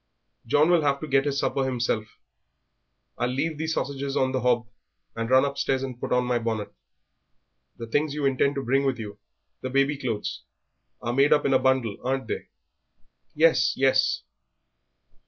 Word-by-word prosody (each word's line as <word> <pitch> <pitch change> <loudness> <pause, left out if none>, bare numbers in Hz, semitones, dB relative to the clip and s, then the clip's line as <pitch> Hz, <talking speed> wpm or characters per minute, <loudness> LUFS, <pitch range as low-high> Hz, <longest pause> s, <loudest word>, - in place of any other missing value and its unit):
"John 150 +7 +4
will 175 -2 +4
have 140 -2 +1
to 155 - -5
get 135 0 +2
his 140 -1 -1
supper 135 0 0
himself; 120 -4 -2 1.0
I'll 125 - +1
leave 150 +4 -2
these 160 0 -1
sausages 140 0 -2
on 130 0 +2
the 130 -1 -1
hob, 120 -1 +2 0.5
and 115 0 -3
run 130 +1 +5
upstairs 135 -1 -1
and 130 -3 -6
put - - -5
on 125 0 +2
my 125 -1 +1
bonnet. 110 -3 -3 1.0
The 115 - -6
things 145 +5 0
you 150 -2 -1
intend 135 +1 +2
to 140 - -3
bring 135 +3 +2
with 135 -3 0
you, 105 -2 -8 0.4
the 130 - -4
baby 140 +2 +2
clothes, 115 -6 -3 0.6
are 120 - -1
made 140 +3 +3
up 150 - +4
in 135 - +2
a 130 - +5
bundle, 130 -6 +1
aren't 130 -1 -1
they?" - - -4 0.9
"Yes, 155 -5 +4
yes." 130 0 +2
130 Hz, 175 wpm, -25 LUFS, 125-140 Hz, 1.0 s, run